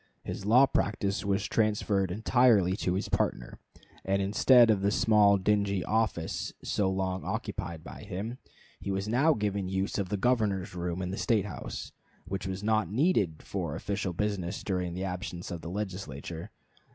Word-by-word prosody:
His 100 Hz, -, -5 dB
law 125 Hz, +5 st, +7 dB
practice 100 Hz, -5 st, -1 dB
was 100 Hz, 0 st, 0 dB
transferred 105 Hz, -3 st, +1 dB
entirely 105 Hz, -2 st, +3 dB
to 90 Hz, -3 st, 0 dB
his 95 Hz, -, -2 dB
partner, -, -, -1 dB, 0.4 s
and 95 Hz, +1 st, +1 dB
instead 115 Hz, +4 st, +5 dB
of 100 Hz, -3 st, +1 dB
the 100 Hz, -, +2 dB
small 105 Hz, -1 st, +4 dB
dingy 100 Hz, -1 st, +1 dB
office 110 Hz, -7 st, -1 dB
so 100 Hz, -2 st, +1 dB
long 95 Hz, -1 st, -2 dB
occupied 80 Hz, -2 st, -4 dB
by -, -, -9 dB
him, 110 Hz, +7 st, -5 dB, 0.4 s
he -, -, -6 dB
was 95 Hz, +1 st, -1 dB
now 135 Hz, +8 st, +4 dB
given 100 Hz, -3 st, -1 dB
the 95 Hz, -, -5 dB
use 95 Hz, +2 st, -1 dB
of 95 Hz, -2 st, -2 dB
the 105 Hz, -, -1 dB
Governor's 105 Hz, -5 st, +1 dB
room 90 Hz, +1 st, -3 dB
in 90 Hz, -, -3 dB
the 95 Hz, -, -4 dB
State 110 Hz, -5 st, +2 dB
house, 105 Hz, -, -6 dB, 0.3 s
which 95 Hz, 0 st, -4 dB
was 95 Hz, +1 st, -4 dB
not 110 Hz, -4 st, +1 dB
needed 105 Hz, -, +1 dB
for 85 Hz, -6 st, -3 dB
official 100 Hz, +1 st, -2 dB
business 95 Hz, 0 st, -2 dB
during 90 Hz, -3 st, -2 dB
the 95 Hz, -, -3 dB
absence 90 Hz, -1 st, -5 dB
of 85 Hz, -2 st, -5 dB
the 85 Hz, -, -6 dB
Legislature. 90 Hz, -5 st, -5 dB
100 Hz, 170 wpm, -29 LUFS, 90-105 Hz, 0.4 s, law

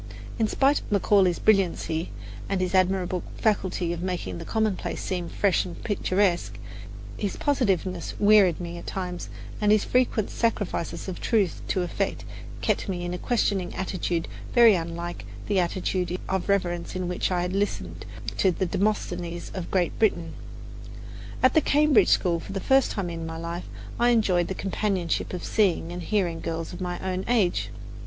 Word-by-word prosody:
But -, -, -5 dB
in 220 Hz, -, +4 dB
spite 275 Hz, +6 st, +3 dB
of -, -, -12 dB
Macaulay's 195 Hz, -3 st, +4 dB
brilliancy 175 Hz, -5 st, +1 dB, 0.4 s
and 195 Hz, -, 0 dB
his 185 Hz, 0 st, -1 dB
admirable 185 Hz, -1 st, +2 dB, 0.2 s
faculty 185 Hz, -5 st, 0 dB
of 170 Hz, -, -5 dB
making 175 Hz, -, -3 dB
the -, -, -7 dB
commonplace 210 Hz, -6 st, -1 dB
seem 180 Hz, -2 st, -3 dB
fresh 200 Hz, -3 st, +2 dB
and 175 Hz, -, -8 dB
picturesque, 190 Hz, -3 st, +1 dB, 0.6 s
his 200 Hz, -2 st, -2 dB
positiveness 190 Hz, -, 0 dB
wearied 205 Hz, -5 st, +5 dB
me 170 Hz, -1 st, -5 dB
at -, -, -11 dB
times, 180 Hz, -2 st, -4 dB, 0.3 s
and 210 Hz, 0 st, +4 dB
his 215 Hz, -1 st, +4 dB
frequent 245 Hz, -4 st, +1 dB
sacrifices 205 Hz, -8 st, -1 dB
of 185 Hz, -, -5 dB
truth 205 Hz, -7 st, +1 dB
to 185 Hz, -, 0 dB
effect 175 Hz, -, -2 dB, 0.4 s
kept -, -, 0 dB
me 175 Hz, -2 st, -2 dB
in 175 Hz, -, -3 dB
a 180 Hz, -, -4 dB
questioning 200 Hz, -6 st, 0 dB
attitude 180 Hz, -3 st, -2 dB, 0.3 s
very 235 Hz, -3 st, +8 dB
unlike 170 Hz, 0 st, -3 dB, 0.2 s
the 200 Hz, -2 st, +1 dB
attitude 180 Hz, 0 st, -1 dB
of 190 Hz, 0 st, -2 dB
reverence 175 Hz, -4 st, 0 dB
in 185 Hz, -1 st, -2 dB
which 180 Hz, -, -1 dB
I 180 Hz, -1 st, 0 dB
had 180 Hz, +1 st, -2 dB
listened 205 Hz, +1 st, -2 dB, 0.4 s
to 190 Hz, -, +5 dB
the 185 Hz, +1 st, 0 dB
Demosthenes 175 Hz, -3 st, -2 dB
of 185 Hz, -3 st, -5 dB
Great 180 Hz, -3 st, 0 dB
Britain. 170 Hz, -7 st, +1 dB, 1.1 s
At 255 Hz, -, +6 dB
the 315 Hz, -, +5 dB
Cambridge 290 Hz, -9 st, +4 dB
school, 170 Hz, -2 st, +3 dB
for 195 Hz, -, -8 dB
the 195 Hz, -, -2 dB
first 270 Hz, +5 st, +3 dB
time 185 Hz, -4 st, -3 dB
in 165 Hz, -1 st, -5 dB
my 160 Hz, 0 st, -5 dB
life, 170 Hz, +2 st, -5 dB, 0.3 s
I 240 Hz, +1 st, +4 dB
enjoyed 195 Hz, -7 st, +3 dB
the 190 Hz, -, -3 dB
companionship 195 Hz, -3 st, -1 dB
of 180 Hz, -, -5 dB
seeing 185 Hz, -5 st, +1 dB
and 175 Hz, 0 st, -5 dB
hearing 175 Hz, -3 st, 0 dB
girls 165 Hz, +1 st, -4 dB
of 175 Hz, -, -8 dB
my 180 Hz, -1 st, -2 dB
own 185 Hz, 0 st, -1 dB
age. 215 Hz, -8 st, +2 dB
185 Hz, 170 wpm, -26 LUFS, 175-205 Hz, 1.1 s, very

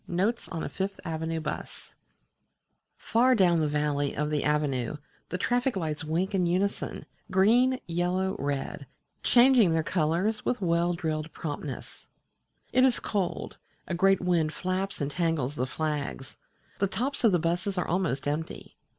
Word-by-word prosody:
NOTES 200 Hz, +7 st, -1 dB
ON 165 Hz, -3 st, -4 dB
A -, -, -2 dB
FIFTH 195 Hz, +1 st, -3 dB
AVENUE 160 Hz, 0 st, -2 dB
BUS 155 Hz, -, -6 dB, 1.0 s
Far 250 Hz, +3 st, +3 dB
down 175 Hz, -5 st, +4 dB
the 155 Hz, -, +2 dB
valley 145 Hz, -1 st, 0 dB
of 150 Hz, +1 st, -1 dB
the 150 Hz, -, 0 dB
Avenue 150 Hz, -3 st, 0 dB, 0.3 s
the 180 Hz, -, -2 dB
traffic 245 Hz, +6 st, +1 dB
lights 160 Hz, -4 st, -2 dB
wink 170 Hz, +6 st, -1 dB
in 180 Hz, -3 st, +2 dB
unison, 190 Hz, +4 st, -1 dB, 0.2 s
green, 245 Hz, +7 st, +4 dB
yellow, 180 Hz, +2 st, 0 dB
red, 140 Hz, -1 st, -3 dB, 0.3 s
changing 245 Hz, -5 st, +6 dB
their 160 Hz, -1 st, +1 dB
colours 175 Hz, +7 st, 0 dB
with 250 Hz, -, 0 dB
well 170 Hz, -1 st, +1 dB
drilled 160 Hz, -2 st, -3 dB
promptness. 145 Hz, -3 st, -6 dB, 0.7 s
It 255 Hz, -, +5 dB
is 260 Hz, -2 st, +4 dB
cold: 195 Hz, -4 st, -2 dB, 0.3 s
a -, -, -3 dB
great 195 Hz, +2 st, +3 dB
wind 170 Hz, -4 st, +1 dB
flaps 185 Hz, +2 st, -2 dB
and 140 Hz, 0 st, -1 dB
tangles 165 Hz, -5 st, 0 dB
the 130 Hz, -3 st, -2 dB
flags; 145 Hz, -4 st, -3 dB, 0.4 s
the 200 Hz, -, +2 dB
tops 270 Hz, +8 st, -2 dB
of 225 Hz, -, +6 dB
the 180 Hz, -, +4 dB
buses 175 Hz, +4 st, -1 dB
are 180 Hz, -, 0 dB
almost 165 Hz, -7 st, 0 dB
empty. 150 Hz, +3 st, -4 dB
175 Hz, 150 wpm, -28 LUFS, 155-195 Hz, 1.0 s, changing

